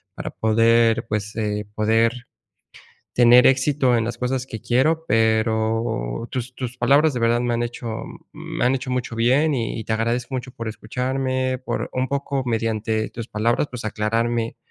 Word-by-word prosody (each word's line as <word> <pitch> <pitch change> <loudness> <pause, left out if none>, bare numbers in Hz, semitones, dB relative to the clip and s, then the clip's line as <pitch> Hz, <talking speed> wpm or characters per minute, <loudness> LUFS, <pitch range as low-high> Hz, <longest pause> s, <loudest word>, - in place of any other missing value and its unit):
para - - -5
poder, 115 +1 +3
pues, 105 0 -3
eh, 105 -1 -2
poder 110 +2 +3 1.0
tener 120 +1 +7
éxito 135 -1 +3
en 115 - 0
las 120 - -4
cosas 125 +1 -1
que 115 -4 -8
quiero. 155 +7 +2
Pero, 110 - 0
tus 125 0 -4
tus 125 -1 -5
palabras 145 +2 +4
de - - -1
verdad 115 +1 +2
me 120 -1 0
han 120 - -1
hecho 120 -1 -5 0.3
me - - -5
han 130 +2 +3
hecho 130 0 -4
mucho 125 -2 -2
bien 130 +7 +3
y 115 -2 -3
te 110 - -1
agradezco 120 +3 -1
mucho 130 0 -5
por 115 -2 -6
escucharme, 130 +3 -2
por 130 - -3
un 130 0 0
poco 140 -1 -2
mediante 110 -1 -1
tus 115 -1 -7
palabras, 115 +6 0
pues 125 -3 -6
aclararme 115 +2 -1
120 Hz, 165 wpm, -22 LUFS, 110-130 Hz, 1.0 s, tener